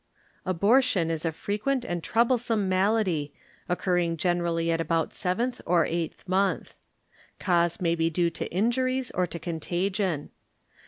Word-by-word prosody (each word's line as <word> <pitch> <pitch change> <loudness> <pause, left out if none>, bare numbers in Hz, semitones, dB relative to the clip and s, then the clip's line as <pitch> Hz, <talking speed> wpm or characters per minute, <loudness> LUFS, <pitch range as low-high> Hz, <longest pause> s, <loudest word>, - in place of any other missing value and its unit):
Abortiom 200 -1 +3
is 160 0 -3
a 165 - +1
frequent 215 - -2
and 175 -5 -3
trouble 235 +2 +2
some 225 -4 0
malady, 185 -6 +1 0.3
occurring 175 -2 +1
general^ 170 0 0
at 165 0 +1
about 165 0 0
seventh 230 +7 -1
or 170 -2 +3
eighth 170 +2 -4
month. 190 +1 0 0.6
Cause 175 -3 +1
may 170 -2 +1
be 165 -1 +1
due 170 +1 +1
to - - -5
injuries 255 +6 0
or 180 0 0
to 170 - -6
contagion. 175 +1 -2
180 Hz, 140 wpm, -27 LUFS, 165-210 Hz, 0.6 s, Abortiom